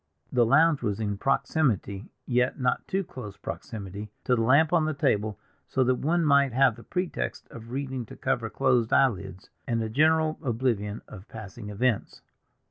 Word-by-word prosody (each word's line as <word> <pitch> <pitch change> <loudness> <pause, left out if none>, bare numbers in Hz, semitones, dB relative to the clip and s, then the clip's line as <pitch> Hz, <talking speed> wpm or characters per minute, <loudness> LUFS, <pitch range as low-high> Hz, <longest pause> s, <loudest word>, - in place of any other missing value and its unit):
The 120 -2 +3
lounge 155 +4 +4
was 105 -3 -2
in 105 -2 -2
proximity—yet 125 - 0
not 125 -1 0
too 195 +1 0
close 115 - -9
proximity—to 105 +1 -4
the 115 - 0
lamp 140 +8 +4
on 165 -3 +4
the 155 -1 -1
table; 110 - 0 0.3
so 130 - +1
that 130 0 +3
one 165 +2 +1
might 140 -3 +4
have 130 -2 +4
the 115 - -13
pretext 180 -1 -3
of 115 0 -10
reading 130 -2 -4
to - - -10
cover 125 -4 -1
closed 125 -2 +1
eyelids 100 -7 +1 0.2
and 115 -3 0
a 110 - -3
general 155 +5 +2
oblivion 115 -5 -1
of 100 0 -11
passing 105 0 -9
events. 110 +2 -1
125 Hz, 160 wpm, -27 LUFS, 110-140 Hz, 0.3 s, lounge